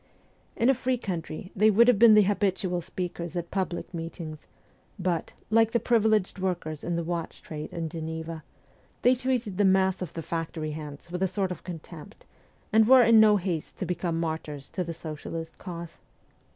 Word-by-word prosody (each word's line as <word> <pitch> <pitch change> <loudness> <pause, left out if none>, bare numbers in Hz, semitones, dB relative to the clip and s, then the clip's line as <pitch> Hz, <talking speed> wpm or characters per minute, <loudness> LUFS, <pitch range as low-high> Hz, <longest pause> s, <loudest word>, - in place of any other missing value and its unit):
In 230 - +2
a 270 - +6
free 255 0 0
country 180 -4 -5
they 215 +2 +5
would 230 +3 +5
have 245 -5 +5
been 230 -2 +8
the 210 - +7
habitual 190 -2 0
speakers 175 0 -5
at 170 -1 -4
public 185 -2 -3
meetings; 165 -2 -7 0.5
but, 180 -3 -2 0.2
like 225 0 +4
the 235 - +3
privileged 220 -4 +2
workers 175 -5 -3
of 175 - -1
the 170 - -1
watch 170 0 -4
trade 150 -1 -7
in 165 -1 -3
Geneva, 160 0 -5 0.6
they 250 - +6
treated 250 -6 -1
the - - +5
mass 190 -1 +3
of 180 - -5
the 165 - -5
factory 160 -1 -3
hands 150 +1 -8
with 180 +1 -4
a 190 - +3
sort 190 0 -1
of 180 - -6
contempt, 170 +2 -10 0.5
anc| 220 0 +6
were 260 0 +8
in 230 -1 +7
no 215 -1 +7
haste 175 -5 -3
to - - -3
become 170 -1 -2
martyrs 160 -4 -4
to 185 - -2
the 170 -1 -5
socialist 160 +1 -7
cause. 170 -3 -8
180 Hz, 180 wpm, -27 LUFS, 165-210 Hz, 0.6 s, been